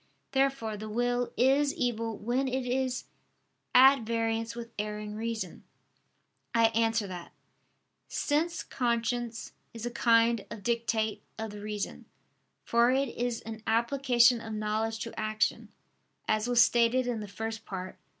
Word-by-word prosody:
Therefore 270 -6 +1
the 215 +1 -7
will 245 +2 0
is 275 +3 +3
evil 230 -3 -1
when 245 +5 0
it 260 0 -1
is 255 0 -1 0.7
at 270 +1 +8
variance 225 0 -1
with 235 0 -7
erring 210 0 -4
reason. 225 +1 -4 0.9
I 230 -1 +5
answer 225 -1 +1
that, 180 -3 -8 0.7
Since 325 +3 0
conscience 235 -1 -2 0.2
is 230 0 -5
a 240 - -2
kind 230 -2 +3
of 205 - -8
dictate 230 -2 0 0.2
of 220 -1 -4
the 205 0 -8
reason, 210 -1 -4 0.6
for 235 +1 +3
it 270 +1 +2
is 240 -1 -2
an 220 0 -8
application 240 +1 +4
of 225 -1 -6
knowledge 215 +1 -1
to 230 - -5
action, 215 0 0 0.6
as 215 +1 +1
was 240 -1 +6
stated 240 +2 +3
in 245 -2 -2
the 210 - -6
First 225 +2 -5
Part 185 -1 -6
(Q. - - -40
230 Hz, 140 wpm, -29 LUFS, 220-245 Hz, 0.9 s, at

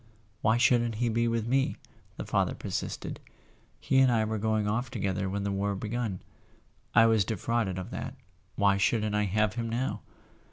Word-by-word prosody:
"Why 110 +2 +3
shouldn't 120 -2 +3
he 120 +2 0
be 115 +1 +1
with 115 -1 0
me?" 135 +3 +1 0.4
the - - -5
father - - 0
per¬ - - -7
sisted. - - -4 0.6
"He 135 - +2
and 130 -1 +5
I 110 -2 +2
were 110 0 -2
going 110 0 +1
off 120 +4 -1
together 100 -5 -2
when 100 +1 -2
the 100 - -1
war 100 +1 -1
begun. 110 -1 -3 0.7
I 115 +2 +8
was 110 -3 +4
defrauded 110 0 -1
of 95 - -6
that—why 100 -1 -2
shouldn't 105 +1 +1
I 105 0 +2
have 105 +2 +1
him 115 0 -3
now?" 120 +4 -2
110 Hz, 175 wpm, -29 LUFS, 100-120 Hz, 0.7 s, I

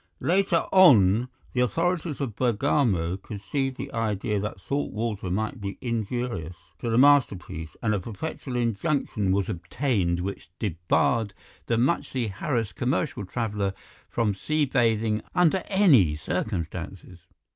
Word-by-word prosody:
Later 180 -1 +2
on 120 - +6 0.2
the 125 - -1
authorities 165 +3 0
of 130 -7 -3
Bergamo 110 - +1
conceived 130 +7 -3
the - - -6
idea 105 -2 -1
that 105 -1 -4
salt 140 +8 -2
water 105 -4 -3
might 105 +3 -2
be 100 -1 -5
injurious 115 -7 -3 0.2
to 120 - -3
the 115 - +2
masterpiece, 100 - +3
and 105 -2 +2
a 105 - 0
perpetual 125 - -6
injunction 115 -2 0
was 95 -1 +1
obtained 90 - -1
which 95 0 -5
debarred 100 +3 0 0.3
the 115 - +1
muchly 125 -3 0
harassed 115 +2 -2
commercial 130 - -1
traveller 105 -3 -2 0.3
from 115 -3 0
sea 155 +9 0
bathing 115 -4 +1
under 180 +1 +3
any 145 - +5
circumstances. 90 +1 -4
115 Hz, 125 wpm, -26 LUFS, 95-135 Hz, 0.3 s, on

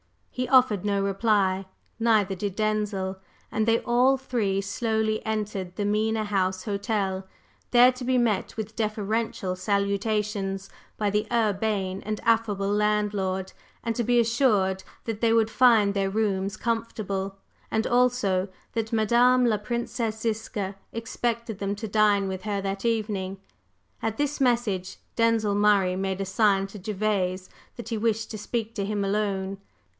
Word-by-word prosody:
He 255 0 -2
offered 250 -7 +4
no 200 -1 +1
reply, 195 -2 +1 0.3
neither 215 -4 +3
did 195 0 -3
Denzil, 210 -3 -1 0.3
and 220 0 0
they 230 0 +4
all 250 +3 +3
three 225 -7 -1
slowly 220 +2 -1
entered 205 -4 -3
the 205 - -2
Mena 215 +1 +1
House 190 -2 0
Hotel, 200 -2 -2 0.4
there 245 +1 +7
to 255 0 -8
be 255 +1 +2
met 225 -4 0
with 220 0 -5
deferential 215 -3 -1
salutations 200 0 -1 0.3
by 205 -1 0
the 210 +1 0
urbane 205 -4 0
and 215 0 -3
affable 210 -4 +1
landlord, 205 -3 0 0.3
and 230 -1 -1
to 240 - 0
be 240 +1 +3
assured 220 -6 +2 0.2
that 225 -2 -4
they 230 -1 +3
would 225 -1 +3
find 225 -6 +5
their 195 -1 0
rooms 200 -1 -1
comfortable, 200 -4 -2 0.3
and 220 0 0
also 240 -7 +2 0.3
that 225 -1 -2
"Madame 240 +3 +4
la 220 -3 +3
Princesse 230 0 -3
Ziska" 215 -3 -2 0.2
expected 230 -1 -3
them 200 0 -1
to 220 +2 -5
dine 205 -1 +3
with 190 -1 -4
her 205 -1 -1
that 195 0 -3
evening. 205 -4 -1 0.6
At 220 -1 -2
this 290 0 -1
message, 230 -8 +1 0.2
Denzil 230 -3 +2
Murray 200 -3 +3
made 190 0 -2
a - - -1
sign 195 0 +2
to 200 +1 -10
Gervase 190 -2 -1 0.3
that 235 -2 -8
he 230 - -1
wished 225 0 0
to 215 - -5
speak 225 +1 -3
to 200 -3 -1
him 205 -1 -1
alone. 195 -1 -1
210 Hz, 150 wpm, -26 LUFS, 195-225 Hz, 0.6 s, there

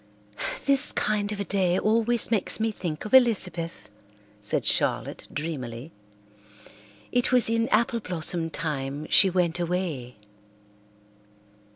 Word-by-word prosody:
"This 275 -1 +7
kind 210 -1 0
of 210 - -5
a - - -1
day 185 -3 +1
always 230 +3 0
makes 215 -2 -1
me 225 0 0
think 170 -6 -6
of 215 - -8
Elizabeth," 185 - +2 0.5
said 105 0 -1
Charlotte - - 0
dreamily. 140 -3 -6 1.2
"It 245 0 +1
was 245 -3 +4
in 230 +1 0
apple 235 -1 +1
blossom 170 -3 -2
time 150 -3 -4
she 195 - +6
went 175 -2 0
away." 170 -8 -4
185 Hz, 115 wpm, -25 LUFS, 160-225 Hz, 1.2 s, This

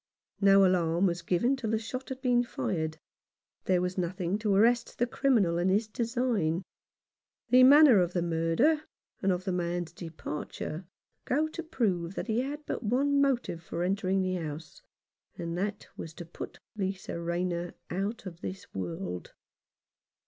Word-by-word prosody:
No 195 0 +7
alarm, 175 -1 +2
was 175 -2 0
given 185 +10 +2
till 250 -5 -4
the 220 - +2
shot 250 +4 -6
had 265 0 -6
been 245 -1 +3
fired; 160 -8 -2 0.7
there 180 -1 +3
was 180 +1 -2
nothing 180 +2 -1
to 215 -1 0
arrest 235 +3 +3
the 240 - +2
criminal 230 -10 +2
in 180 +2 +2
his 210 +3 +2
design. 225 -7 0 0.9
The 250 +1 +8
manner 275 -3 +8
of 180 -1 +1
the 175 - 0
murder, 170 - +2 0.4
and 195 - +2
of 180 0 -1
the 190 - -1
man's 175 -1 -2
departure, 165 0 -6 0.4
go 300 +4 +1
to 330 - -5
prove 195 - -1
that - - -3
he 225 0 0
had 290 +4 -4
but - - -3
one 275 +5 +2
motive 245 -11 0
for 170 +1 -4
entering 190 0 +1
the 185 0 -1
house, 160 - -7 0.6
and 170 0 -4
that 205 +1 -3
was 160 0 -8
to 175 - -8
put 170 - -8 0.2
Lisa 190 -3 -3
Rayner 175 0 -2 0.2
out 200 +6 -3
of 170 -2 -8
this 190 +1 -7
world. 90 -1 -5
190 Hz, 160 wpm, -29 LUFS, 170-240 Hz, 0.9 s, The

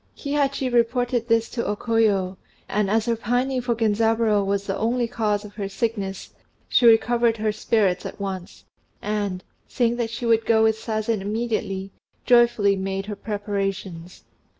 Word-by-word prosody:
Kihachi 280 -2 -1
reported 240 0 +1
this 230 -1 +2
to 235 - -3
O 205 - -1
Koyo; 205 -5 +1 0.3
and 205 -1 0
as 220 +1 +2
her 235 -1 +1
pining 250 +3 0
for 240 -1 -1
Genzaburô 220 -1 +2
was 200 0 -1
the 195 - -2
only 235 +2 0
cause 215 -3 -1
of 205 - -11
her 200 -2 -3
sickness, 195 -2 -3 0.4
she 240 - +4
recovered 235 0 +4
her 215 0 0
spirits 210 -3 +1
at - - -8
once, 190 -3 -6 0.3
and, 205 -3 -3 0.2
saying 240 -2 0
that 235 -2 -1
she 230 +1 -5
would 225 -1 +3
go 220 -1 +4
with 220 0 +2
Sazen 220 -1 -2
immediately, 205 -2 -3 0.3
joyfully 235 -5 +4
made 195 0 -3
her 210 0 -5
preparations. 195 -4 -4
220 Hz, 155 wpm, -23 LUFS, 200-235 Hz, 0.4 s, she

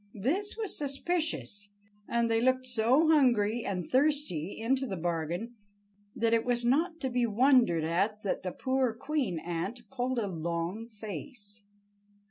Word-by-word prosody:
This 375 - -1
was 435 -3 -3
suspicious, 285 -8 -2 0.4
and 235 0 +1
they 225 0 +2
looked 255 +1 +2
so 250 +6 +3
hungry 240 -7 +3
and 180 -3 -3
thirsty, 260 - +1
into 260 +4 0
the 190 - -4
bargain, 170 +6 -2 0.6
that 230 0 +1
it 225 -1 +3
was 240 -1 0
not 325 +7 +2
to 265 - 0
be 245 -1 +2
wondered 235 - +4
at 195 +6 0
that 200 - -1
the 185 - -3
poor 260 +1 0
queen 275 - -1
ant 175 +9 -4
pulled 255 -1 -1
a 230 - +1
long 170 +4 -3
face. 215 0 -7
235 Hz, 145 wpm, -30 LUFS, 200-265 Hz, 0.6 s, wondered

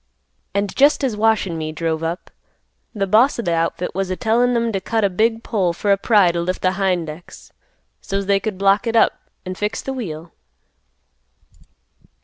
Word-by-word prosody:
And 200 -1 -1
jest 285 +1 +4
as 250 -5 0
Wash 220 0 +2
an' 165 -3 -4
me 155 0 -4
drove 160 0 -2
up, 165 +2 -4 0.7
th' 195 -1 -1
boss 240 +6 +4
of 235 - -4
th' - - 0
outfit 165 +1 -1
was 195 0 -2
a 185 - -1
tellin' 240 +4 +1
'em 230 0 0
t' 195 - -1
cut 225 +3 -1
a 200 - +2
big 225 +4 +1
pole 190 -7 0
for 200 +4 -1
a 200 - +4
pry 200 -4 +4
t' 170 - -3
lift 180 +2 -3
th' 185 0 +2
hind 185 -4 0
ex, 155 +3 -11 0.5
so's 195 0 -3
they 200 0 +2
could 210 -2 -4
block 200 +4 +2
it 230 - -1
up, 225 - +4 0.3
an' 185 - -4
fix 210 +4 -3
th' - - -6
wheel. 170 -9 -6
195 Hz, 195 wpm, -20 LUFS, 175-225 Hz, 0.7 s, jest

